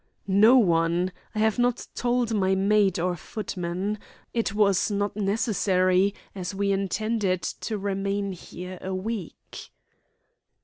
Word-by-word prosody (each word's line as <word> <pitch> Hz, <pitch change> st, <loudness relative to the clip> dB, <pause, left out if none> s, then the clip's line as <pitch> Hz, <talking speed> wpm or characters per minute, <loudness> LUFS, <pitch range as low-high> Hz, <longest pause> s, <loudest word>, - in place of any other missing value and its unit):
"No 210 Hz, +6 st, +6 dB
one. 170 Hz, -3 st, +2 dB, 0.2 s
I -, -, -4 dB
have 220 Hz, +1 st, +2 dB
not 245 Hz, 0 st, +1 dB
told 245 Hz, -2 st, 0 dB
my 190 Hz, -2 st, +2 dB
maid 200 Hz, -1 st, +3 dB
or 180 Hz, +1 st, 0 dB
footman. 185 Hz, +2 st, -4 dB, 0.3 s
It 230 Hz, -4 st, 0 dB
was 200 Hz, -2 st, +3 dB
not 205 Hz, 0 st, -1 dB
necessary, 195 Hz, -2 st, +2 dB, 0.2 s
as 185 Hz, 0 st, -5 dB
we 200 Hz, 0 st, +1 dB
intended 195 Hz, -1 st, 0 dB
to 220 Hz, -, -3 dB
remain 200 Hz, 0 st, -2 dB
here 180 Hz, 0 st, -8 dB
a 190 Hz, 0 st, -3 dB
week." 200 Hz, -2 st, -6 dB
200 Hz, 125 wpm, -26 LUFS, 185-215 Hz, 0.3 s, No